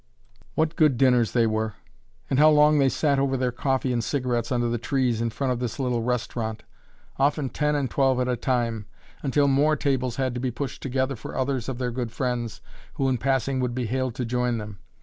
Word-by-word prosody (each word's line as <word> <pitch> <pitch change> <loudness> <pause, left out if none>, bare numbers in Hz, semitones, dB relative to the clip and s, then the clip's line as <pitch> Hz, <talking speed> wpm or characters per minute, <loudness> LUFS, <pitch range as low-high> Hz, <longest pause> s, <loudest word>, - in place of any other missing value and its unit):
What 160 +1 +1
good 155 -7 +3
dinners 125 -3 +3
they 120 -2 +3
were! 110 -1 -1 0.5
and 135 - +1
how 155 +1 +7
long 150 0 +5
they 135 -1 +4
sat 140 +2 +1
over 135 -1 +1
their 125 -1 0
coffee 130 +1 0
and 120 -1 0
cigarettes 125 -4 -1
under 120 -1 +1
the 120 0 -1
trees 125 -2 0
in 115 - 0
front 130 +3 -1
of 120 - -4
this 125 -3 -3
little 125 -4 0
restaurant 115 -2 -2 0.5
often 140 0 +1
ten 150 +2 0
and 140 -2 0
twelve 135 -1 +2
at 125 - 0
a 125 - +1
time, 115 -4 -1 0.3
until 140 +1 +2
more 145 +3 +3
tables 130 -5 -1
had 130 -2 -1
to 125 - -3
be 130 +1 -1
pushed 125 +3 -5
together 130 +1 -1
for 110 - -8
others 130 -2 -1
of 130 - -4
their 125 -1 -2
good 120 -1 -3
friends, 120 -2 -3 0.3
who 135 - 0
in 125 -2 0
passing 135 0 0
would 125 -1 -1
be 125 -1 -1
hailed 130 +1 -2
to 125 - -2
join 125 0 0
them. 105 -3 -7
125 Hz, 215 wpm, -25 LUFS, 120-135 Hz, 0.5 s, how